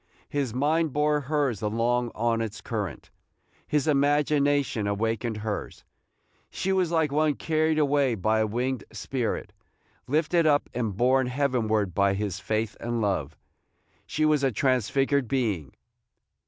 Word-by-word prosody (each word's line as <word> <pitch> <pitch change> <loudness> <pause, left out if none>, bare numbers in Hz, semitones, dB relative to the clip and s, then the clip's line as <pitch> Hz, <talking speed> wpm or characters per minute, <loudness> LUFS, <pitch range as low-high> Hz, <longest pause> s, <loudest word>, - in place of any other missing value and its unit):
His 140 -4 -1
mind 150 +4 +1
bore 150 0 +2
hers 140 -6 -1
along 120 +3 0
on 115 0 0
its 110 -2 -4
current. 100 - -5 0.6
His 150 -2 +1
imagination 145 -5 +2
awakened 110 +2 -1
hers. 105 -1 -5 0.7
She 190 - -2
was 185 -3 +1
like 160 -3 +1
one 150 0 +2
carried 155 0 +1
away 140 -4 +2
by 110 +2 +1
a 110 - +2
winged 125 +4 -2
spirit, 115 +2 -3 0.5
lifted 160 +3 +2
up 145 -1 +2
and 110 -6 -2
borne 130 +2 +3
heavenward 120 -7 0
by 100 +2 +2
his 100 -2 -3
faith 110 +2 -2
and 120 0 -2
love. 80 -9 -1 0.7
She 155 - 0
was 150 -2 +3
a 135 - +3
transfigured 135 +3 +1
being. 105 - -1
125 Hz, 135 wpm, -26 LUFS, 110-145 Hz, 0.7 s, borne